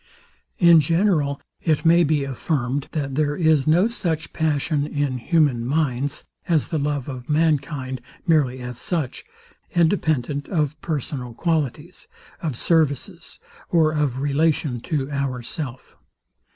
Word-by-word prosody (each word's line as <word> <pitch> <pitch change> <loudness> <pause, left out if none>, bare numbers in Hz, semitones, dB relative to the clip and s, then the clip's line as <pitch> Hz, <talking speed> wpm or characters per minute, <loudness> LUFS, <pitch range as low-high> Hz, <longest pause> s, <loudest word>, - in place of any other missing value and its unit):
In 170 -2 +7
general, 155 -3 +1 0.2
it 155 0 0
may 170 +1 +6
be 150 -2 +1
affirmed, 135 0 -2
that 140 -4 -2
there 145 +1 +1
is 155 -4 +3
no 175 +7 +4
such 170 -9 -3
passion 150 -1 0
in 145 -4 -1
human 145 -4 +2
minds, 140 0 -1 0.2
as 160 -4 +1
the 160 - -1
love 145 -2 -2
of 130 -1 -7
mankind, 145 -4 0 0.2
merely 140 -7 +2
as 125 -1 -6
such, 160 -8 -2 0.5
independent 155 -5 +1
of 150 -5 0
personal 135 -6 -4
qualities, 160 +1 -2 0.3
of 155 -6 -2
services, 165 +3 0 0.3
or 160 -3 +3
of 150 -5 0
relation 145 -2 +1
to 140 +1 -2
ourself. 130 0 -4
150 Hz, 125 wpm, -23 LUFS, 135-160 Hz, 0.5 s, In